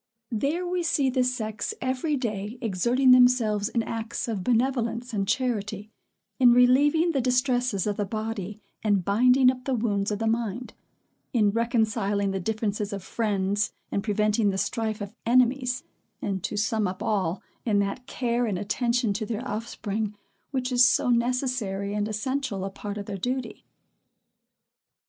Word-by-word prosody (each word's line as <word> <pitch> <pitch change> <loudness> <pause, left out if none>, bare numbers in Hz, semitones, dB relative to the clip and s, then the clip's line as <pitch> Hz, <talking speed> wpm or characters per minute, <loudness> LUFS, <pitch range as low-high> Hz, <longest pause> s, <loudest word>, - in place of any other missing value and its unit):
There 285 +10 -1
we 355 0 -1
see 285 -5 +1
the 255 0 +2
sex 235 - -2
every 260 +4 -1
day 215 -2 -3
exerting 240 +4 +2
themselves 240 -5 +4
in 230 -1 0
acts 225 +1 -4
of 210 -5 -3
benevolence 240 0 0
and 200 -2 -1
charity, 215 -3 -2 0.5
in 245 -2 +7
relieving 285 +7 +4
the 275 -4 0
distresses 250 -4 +1
of 205 -1 -1
the 205 - 0
body, 215 -1 -4 0.2
and 200 -4 +2
binding 250 +5 +5
up 255 -1 -10
the 265 - 0
wounds 205 -3 0
of 210 - -1
the 225 - -2
mind; 230 +1 -2 0.6
in 210 -4 +3
reconciling 220 -3 0
the 195 - -2
differences 210 +1 -2
of 195 -2 -5
friends, 205 -1 -1 0.2
and 200 - -1
preventing 210 0 +2
the 190 - -1
strife 220 0 -2
of 200 0 -6
enemies; 250 +1 +2 0.4
and, 195 -2 -3
to 210 - -3
sum 215 0 +1
up 185 - -5
all, 190 -4 -1 0.2
in 215 -4 +1
that 200 +6 -1
care 240 -2 -1
and 200 -4 -1
attention 235 +3 0
to 215 +2 -3
their 235 +3 -4
offspring, 215 -1 -3 0.3
which 260 -2 -2
is 245 0 +5
so 250 -1 +4
necessary 235 -5 0
and 210 0 -1
essential 220 -2 -2
a 195 - -4
part 205 +1 -6
of 200 - -5
their 200 -1 -5
duty. 250 +1 -3
225 Hz, 160 wpm, -26 LUFS, 205-250 Hz, 0.6 s, in